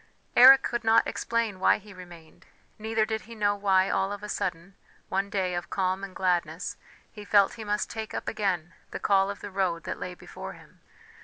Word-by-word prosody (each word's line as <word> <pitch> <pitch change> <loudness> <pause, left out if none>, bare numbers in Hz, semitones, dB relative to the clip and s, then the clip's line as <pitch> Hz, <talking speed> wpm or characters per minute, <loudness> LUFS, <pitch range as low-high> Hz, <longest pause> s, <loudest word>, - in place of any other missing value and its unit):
Eric 265 +2 +9
could 240 -1 -2
not 225 +1 +4
explain 230 -4 -2
why - - +4
he 205 0 -14
remained, 175 -3 -14 0.3
neither 220 0 0
did 220 0 -3
he 230 - -9
know 205 -1 +1
why 195 -2 +3
all 195 +1 0
of 205 0 -6
a 210 - -6
sudden, 180 0 -3 0.4
one 195 +1 -1
day 190 -3 -1
of 175 0 -4
calm 190 0 -1
and 195 -2 -7
gladness, 175 -2 -1 0.4
he 210 - -10
felt 200 -1 +4
he 225 - -8
must 210 0 -1
take 220 -1 -6
up - - -5
again 185 -6 -2 0.2
the - - -6
call 195 -1 +3
of 200 - -6
the 205 - -7
road 185 -3 -1
that - - -5
lay 180 0 -6
before 65 - -9
him. - - -18
195 Hz, 205 wpm, -27 LUFS, 185-215 Hz, 0.4 s, Eric